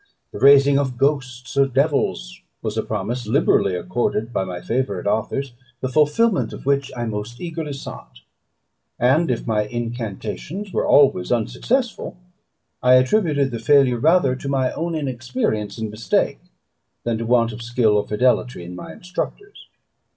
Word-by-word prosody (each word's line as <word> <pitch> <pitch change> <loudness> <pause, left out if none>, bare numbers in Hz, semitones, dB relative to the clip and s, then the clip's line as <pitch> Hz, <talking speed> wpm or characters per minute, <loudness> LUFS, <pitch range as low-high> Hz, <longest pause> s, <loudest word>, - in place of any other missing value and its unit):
The - - -7
raising 140 0 +6
of 130 -3 -2
ghosts 130 -2 -1
or 140 0 +4
devils 135 - 0 0.2
was 110 -1 -3
a 110 - +1
promise 110 +3 -4
liberally 110 - +2
accorded 115 +4 -2
by - - 0
my 90 -2 -5
favourite 115 -6 -2
authors, 120 +5 -1 0.3
the 130 - -2
fulfilment 155 - +2
of - - -10
which 140 -1 +1
I 120 - -2
most 110 +2 -5
eagerly 165 -4 -5
sought; 135 - -9 0.8
and 140 +7 +3
if 120 - -1
my 105 -2 0
incantations 120 - -5
were - - 0
always 135 -11 +4
unsuccessful, - - -1 0.6
I 125 0 +6
attributed 140 0 +2
the 115 - -4
failure 125 0 +4
rather 155 -2 +3
to 140 +1 -6
my 130 -2 +1
own 170 0 -3
inexperience 120 -7 -2
and 110 -2 -4
mistake, 110 +2 0 0.6
than 115 -2 -1
to 115 - -3
a - - -5
want 115 -1 +3
of 115 - -8
skill 115 -2 +2
or 105 - +1
fidelity 125 -2 +1
in 90 +1 -8
my 90 - -8
instructors. 400 - -6
125 Hz, 155 wpm, -21 LUFS, 110-140 Hz, 0.8 s, raising